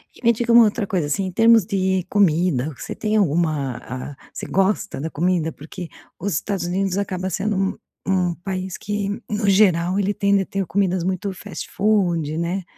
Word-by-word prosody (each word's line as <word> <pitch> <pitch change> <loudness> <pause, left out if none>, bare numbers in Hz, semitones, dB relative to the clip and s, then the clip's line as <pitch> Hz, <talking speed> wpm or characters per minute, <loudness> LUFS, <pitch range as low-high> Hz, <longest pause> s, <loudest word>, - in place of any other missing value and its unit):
E - - -18
me 235 - +6
diga 235 +1 -1
uma 235 0 +9
outra 210 0 -1
coisa, 180 -7 0
assim, 190 +7 0
em 185 - -4
termos 225 +1 +5
de 190 -2 0
comida 170 -7 +2
o - - -8
que - - -14
você - - -5
tem 215 -1 -1
alguma 155 - +1
a 130 +3 -7 0.2
você - - -6
gosta 195 -1 0
da 155 +4 -3
comida? 165 0 0
Porque 165 +4 -9 0.3
os 200 +2 -2
Estados 195 +4 -2
Unidos 190 +1 -1
acaba 190 -2 -2
sendo 205 +4 -1
um 195 0 0 0.3
um 180 -3 +1
país 185 0 -4
que 205 -1 -3 0.2
no 210 -1 0
geral 185 -2 +4
ele 200 0 +1
tende 200 -1 +2
a - - -3
ter 195 +1 -2
comidas 185 -1 0
muito 190 +1 -1
fastfood, 185 -5 -1
né, 175 +3 -2
190 Hz, 195 wpm, -22 LUFS, 170-200 Hz, 0.3 s, uma